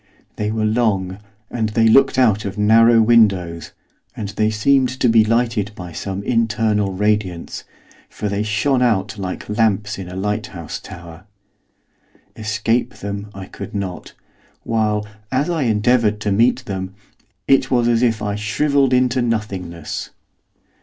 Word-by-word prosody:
They 105 Hz, -, -2 dB
were 110 Hz, 0 st, -1 dB
long, 105 Hz, -4 st, 0 dB, 0.3 s
and 110 Hz, -3 st, -1 dB
they 115 Hz, +1 st, +2 dB
looked 135 Hz, +4 st, +4 dB
out 110 Hz, -5 st, +3 dB
of 100 Hz, 0 st, -5 dB
narrow 115 Hz, +2 st, +5 dB
windows, 95 Hz, -8 st, +2 dB, 0.5 s
and 105 Hz, -2 st, -4 dB
they 110 Hz, +2 st, 0 dB
seemed 130 Hz, +5 st, +2 dB
to -, -, +3 dB
be 115 Hz, -1 st, +5 dB
lighted 115 Hz, -2 st, 0 dB
by 90 Hz, -3 st, -8 dB
some 95 Hz, +4 st, -5 dB
internal 110 Hz, -3 st, +1 dB
radiance, 100 Hz, -3 st, -2 dB, 0.4 s
for 105 Hz, -, -5 dB
they 100 Hz, 0 st, -1 dB
shone 110 Hz, +5 st, +1 dB
out 110 Hz, -3 st, 0 dB
like 95 Hz, -1 st, -5 dB
lamps 105 Hz, -1 st, 0 dB
in 90 Hz, -2 st, -7 dB
a 90 Hz, -, -8 dB
lighthouse 105 Hz, +2 st, -4 dB
tower. 85 Hz, 0 st, -11 dB, 1.1 s
Escape 115 Hz, +3 st, -1 dB
them 100 Hz, +1 st, -6 dB
I 95 Hz, -1 st, -7 dB
could -, -, -9 dB
not, 95 Hz, -3 st, -5 dB, 0.5 s
while, 105 Hz, -2 st, 0 dB, 0.3 s
as 140 Hz, +6 st, 0 dB
I 160 Hz, -6 st, 0 dB
endeavoured 110 Hz, 0 st, +2 dB
to 105 Hz, -, -1 dB
meet 120 Hz, +5 st, +2 dB
them, 95 Hz, -3 st, -5 dB, 0.5 s
it 135 Hz, -1 st, +3 dB
was 120 Hz, -2 st, +2 dB
as 120 Hz, -1 st, +2 dB
if 115 Hz, -4 st, +1 dB
I 105 Hz, -1 st, -1 dB
shrivelled 130 Hz, +7 st, +1 dB
into 125 Hz, 0 st, +2 dB
nothingness. 100 Hz, -8 st, -4 dB
105 Hz, 145 wpm, -19 LUFS, 100-115 Hz, 1.1 s, narrow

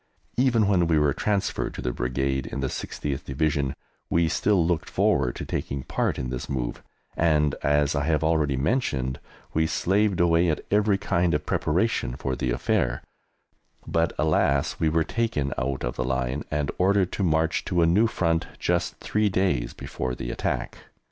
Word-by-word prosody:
Even 120 Hz, -5 st, +3 dB
when 90 Hz, -4 st, +3 dB
we 80 Hz, -2 st, +3 dB
were 75 Hz, -2 st, +3 dB
transferred 100 Hz, -2 st, -1 dB
to -, -, -5 dB
the 60 Hz, -1 st, -1 dB
Brigade 65 Hz, +1 st, -1 dB
in 70 Hz, -, -4 dB
the 65 Hz, -, -1 dB
60th 70 Hz, -1 st, -4 dB
Division 70 Hz, 0 st, -1 dB, 0.3 s
we 85 Hz, 0 st, +3 dB
still 95 Hz, +1 st, +2 dB
looked 85 Hz, -2 st, -1 dB
forward 65 Hz, -3 st, +1 dB
to -, -, -5 dB
taking 70 Hz, -1 st, -3 dB
part -, -, -1 dB
in 65 Hz, 0 st, -3 dB
this 60 Hz, -, -5 dB
move, 65 Hz, -3 st, -3 dB, 0.3 s
and, 75 Hz, -3 st, +2 dB
as 75 Hz, -1 st, +2 dB
I 70 Hz, -1 st, 0 dB
have 80 Hz, -1 st, +1 dB
already 80 Hz, -4 st, +2 dB
mentioned, 65 Hz, -, 0 dB, 0.3 s
we 80 Hz, 0 st, +2 dB
slaved 100 Hz, +3 st, +1 dB
away 85 Hz, 0 st, +4 dB
at 75 Hz, -, -2 dB
every 105 Hz, -1 st, +3 dB
kind 85 Hz, -4 st, +1 dB
of 75 Hz, 0 st, -2 dB
preparation 85 Hz, -, 0 dB
for 65 Hz, 0 st, -3 dB
the 65 Hz, -, -2 dB
affair, -, -, 0 dB, 0.8 s
but, 85 Hz, 0 st, +1 dB
alas, 70 Hz, -3 st, +1 dB
we 80 Hz, -, +2 dB
were 80 Hz, +1 st, +2 dB
taken 80 Hz, -11 st, -1 dB
out 65 Hz, 0 st, -2 dB
of -, -, -3 dB
the 65 Hz, -, 0 dB
line, 65 Hz, +2 st, -2 dB
and 75 Hz, -1 st, -1 dB
ordered 95 Hz, 0 st, +3 dB
to 100 Hz, -, -2 dB
march 80 Hz, -1 st, +1 dB
to 90 Hz, -3 st, +2 dB
a -, -, +5 dB
new 100 Hz, +8 st, +4 dB
front, 85 Hz, -7 st, 0 dB
just 90 Hz, 0 st, 0 dB
three 105 Hz, 0 st, +1 dB
days 90 Hz, -11 st, 0 dB
before 65 Hz, -1 st, -4 dB
the -, -, -4 dB
attack. -, -, -3 dB
80 Hz, 175 wpm, -25 LUFS, 65-90 Hz, 0.8 s, a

